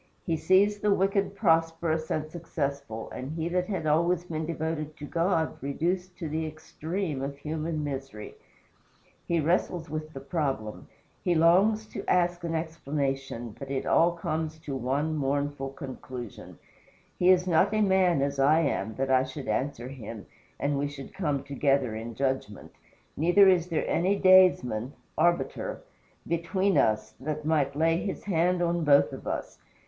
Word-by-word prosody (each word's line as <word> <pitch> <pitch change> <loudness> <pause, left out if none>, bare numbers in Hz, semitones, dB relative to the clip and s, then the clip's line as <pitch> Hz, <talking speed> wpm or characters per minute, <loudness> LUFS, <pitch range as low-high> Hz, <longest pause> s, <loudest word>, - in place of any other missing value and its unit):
He 165 - +1
sees 200 +5 +3
the 210 0 +2
wicked 195 +1 +1
prosperous 165 -3 +1
and 155 0 -1
successful, 140 -8 -4
and 130 +4 -6
he 160 0 -2
that 180 +1 0
had 190 -6 -3
always 170 +3 +2
been 160 -2 -4
devoted 160 -2 -3
to 145 - -7
God 165 +1 0
reduced 180 +6 -2
to 165 - -4
the 160 +1 -2
extreme 155 0 -4
of 140 +1 -4
human 155 +1 -3
misery; 135 -6 -6 0.9
he 170 -1 +1
wrestles 165 0 0
with 155 0 -4
the 135 - -6
problem; 135 -7 -3 0.4
he 175 - +2
longs 195 +7 +4
to - - -6
ask 175 -1 +2
an 165 -1 -2
explanation; 135 -7 -3
but 135 - -7
it 135 -1 -2
all 170 +1 +4
comes 160 -1 -3
to 140 -3 -5
one 140 +5 -1
mournful 140 -1 -1
conclusion: 130 -4 -8 0.6
"He 180 - +4
is 180 -1 +5
not 170 0 +3
a 215 0 +1
man 190 -7 +3
as 140 0 -2
I 150 +4 +5
am, 110 -8 -1
that 135 0 -1
I 130 0 +5
should 130 +1 -7
answer 130 -3 -2
him, 115 -5 -8 0.3
and 140 0 0
we 145 - 0
should 140 -1 -9
come 150 -8 -1
together 140 -3 +1
in 115 +1 -6
judgment. 130 -6 -2 0.4
Neither 175 +6 +5
is 180 -2 +4
there 165 - -1
any 190 +4 +2
daysman 180 - +4 0.2
[arbiter] 175 - 0 0.4
between 185 +4 0
us, 110 0 +2
that 150 +2 -4
might 150 -3 +1
lay 165 +2 +2
his 195 +2 -4
hand 180 -1 +1
on 170 0 0
both 145 -2 +4
of - - -8
us. - - -4
155 Hz, 160 wpm, -28 LUFS, 140-175 Hz, 0.9 s, is